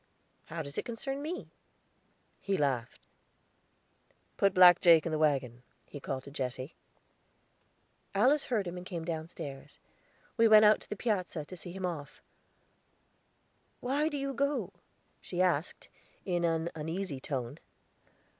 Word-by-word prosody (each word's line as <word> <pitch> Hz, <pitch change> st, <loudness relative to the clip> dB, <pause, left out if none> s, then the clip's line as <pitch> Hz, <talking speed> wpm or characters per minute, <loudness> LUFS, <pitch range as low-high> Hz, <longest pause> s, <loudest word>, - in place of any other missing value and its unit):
How 165 Hz, 0 st, -5 dB
does 140 Hz, -1 st, -5 dB
it -, -, -5 dB
concern 270 Hz, +4 st, -4 dB
me?" 330 Hz, +5 st, -5 dB, 0.9 s
He 195 Hz, -1 st, -1 dB
laughed. 130 Hz, -4 st, -2 dB, 1.3 s
"Put 195 Hz, -1 st, +2 dB
Black 180 Hz, -1 st, +8 dB
Jake 165 Hz, -3 st, +6 dB
in 165 Hz, -, -2 dB
the 155 Hz, -, -1 dB
wagon," 135 Hz, -6 st, +1 dB, 0.2 s
he 145 Hz, -, -9 dB
called 135 Hz, -1 st, -4 dB
to 140 Hz, -, -11 dB
Jesse. 130 Hz, +1 st, -4 dB, 1.4 s
Alice 280 Hz, +3 st, +4 dB
heard 220 Hz, -6 st, 0 dB
him 175 Hz, 0 st, -5 dB
and 180 Hz, -, -7 dB
came 170 Hz, -4 st, -5 dB
downstairs; 160 Hz, -4 st, -6 dB, 0.6 s
we 230 Hz, -, +6 dB
went 215 Hz, -1 st, +8 dB
out 210 Hz, +1 st, +5 dB
on -, -, -15 dB
the -, -, -3 dB
piazza, 185 Hz, -8 st, -2 dB
to 185 Hz, -, -9 dB
see 175 Hz, 0 st, -9 dB
him 190 Hz, +1 st, -4 dB
off. 155 Hz, -5 st, -5 dB, 1.6 s
"Why 285 Hz, +5 st, 0 dB
do 295 Hz, -, -4 dB
you 275 Hz, 0 st, -3 dB
go?" 280 Hz, +3 st, -1 dB, 0.5 s
she 175 Hz, -, -6 dB
asked, 175 Hz, -3 st, 0 dB, 0.4 s
in 175 Hz, -2 st, 0 dB
an 165 Hz, 0 st, 0 dB
uneasy 160 Hz, -1 st, -4 dB
tone. 130 Hz, -3 st, -4 dB
175 Hz, 140 wpm, -31 LUFS, 145-210 Hz, 1.6 s, Black